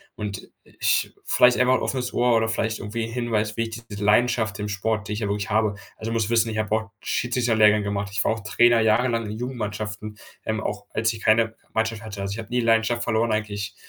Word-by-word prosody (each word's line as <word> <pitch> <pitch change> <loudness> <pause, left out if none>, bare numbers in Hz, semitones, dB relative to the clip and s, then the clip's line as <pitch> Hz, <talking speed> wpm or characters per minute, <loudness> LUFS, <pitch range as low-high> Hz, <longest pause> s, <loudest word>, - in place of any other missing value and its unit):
und 100 -2 -5 0.2
ich - - 0
vielleicht 125 0 +5
einach 125 +1 +4
'n - - +1
offenes 125 -2 -2
Ohr 120 -1 +3
oder 110 - +1
vielleicht 110 0 -1
irgendwie 110 +3 -4
'n 115 - -7
Hinweis, 115 -3 -1
wie 115 - +1
ich 115 +1 -6
diese 100 0 -5
Leidenschaft 110 -1 +2
im 105 - -3
Sport, 105 +1 -1
die 105 - -3
ich 105 - -3
ja 105 - -2
wirklich 100 +1 -2
habe 110 -1 +2 0.2
also, 110 +1 -5
du - - -1
musst 115 -2 0
wissen, 115 -1 +3
ich 110 - -4
habe 110 -1 -1
auch 110 0 -3
Jiu-Jitsu 120 -1 0
'n 110 - +3
Lehrgang 105 -1 +5
gemacht 100 -1 -2
ich 100 - 0
war - - +2
auch 110 - -5
Trainer 120 +2 +4
jahrelang 115 +1 +2
in 105 +1 -5
Jugendmannschaften, 110 -3 -5 0.3
ähm, 110 0 -1
auch 105 -1 -4
als 110 0 +1
ich 110 - -8
keine 115 +1 +3 0.2
Mannschaft 110 -1 -1
hatte. 100 -2 -7
Also, 100 0 -3
ich 110 - -6
habe 115 0 -7
nie 125 +1 0
die 115 - -2
Leidenschaft 115 +1 +2
verloren, 110 0 +1
eigentlich, 105 -1 -3
110 Hz, 240 wpm, -24 LUFS, 105-115 Hz, 0.3 s, vielleicht